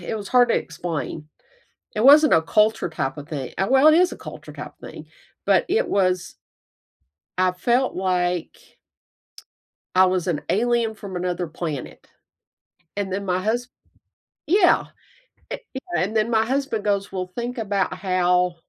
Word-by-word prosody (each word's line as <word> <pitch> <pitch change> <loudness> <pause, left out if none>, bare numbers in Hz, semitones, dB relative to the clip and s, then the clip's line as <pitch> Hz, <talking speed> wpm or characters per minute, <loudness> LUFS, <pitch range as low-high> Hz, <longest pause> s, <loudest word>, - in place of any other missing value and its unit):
It 175 +5 -4
was 205 -2 -7
hard 245 -1 +4
to - - +2
explain. 160 -2 -5 0.7
It 215 - 0
wasn't 295 +3 +7
a 160 - +4
culture 215 +1 +2
type 135 -4 -3
a 145 - -7
thing 145 -5 -6
uh, 190 - +1
well, 270 +4 +6
it 310 - +6
is 360 +2 +4
a - - -6
culture - - -10
type - - -8
thing, - - -10 0.4
but - - +3
it 445 +7 +1
was 185 -2 0 1.0
I 185 0 +3
felt 240 +8 0
like 180 -2 -2 1.2
I 185 - +7
was 185 -2 0
an 155 -4 -1
alien 235 +1 +1
from 200 -4 -8
another 180 0 -2
planet. 155 -4 -6 0.9
And 200 -2 -3
then 200 +1 -3
my 185 0 -1
hus 240 +4 -1 0.8
yeah, 360 +3 +4 0.7
eh - - -2 0.2
yeah, 265 - -5 0.2
and 205 +4 -3
then 215 +1 +1
my 220 -1 +3
husband 265 -4 -1
goes, 200 -1 -1
"Well, 185 -1 -4
think 240 +2 -4
about 200 -3 -1
how 180 -1 +1
195 Hz, 155 wpm, -23 LUFS, 180-235 Hz, 1.2 s, wasn't